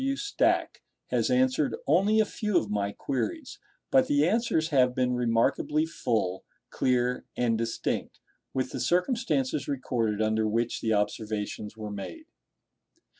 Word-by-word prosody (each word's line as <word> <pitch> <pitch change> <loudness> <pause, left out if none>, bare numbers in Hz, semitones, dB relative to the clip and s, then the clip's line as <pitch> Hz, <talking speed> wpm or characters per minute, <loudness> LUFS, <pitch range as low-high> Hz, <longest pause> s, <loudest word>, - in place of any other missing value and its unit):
W. 275 +1 0
Stack 410 +8 0 0.3
has - - +1
answered 255 - +2
only 195 +9 +3
a 215 - +5
few 210 -1 -1
of 105 - 0
my 100 -1 0
queries; 260 - -4 0.3
but 265 -1 +5
the 285 +1 +3
answers 220 -8 +1
have 125 -4 +3
been 125 -1 +1
remarkably 125 +6 +1
full, 110 - -1 0.3
clear, 125 -1 +1
and 120 -2 +2
distinct, 115 0 -3 0.3
with 130 -1 -2
the - - -4
circumstances 175 - 0
recorded 120 -6 -1
under 110 0 +1
which 115 +2 -1
the 110 - 0
observations 105 0 -2
were 105 -1 -6
made. 205 - -7
125 Hz, 135 wpm, -28 LUFS, -, 0.3 s, a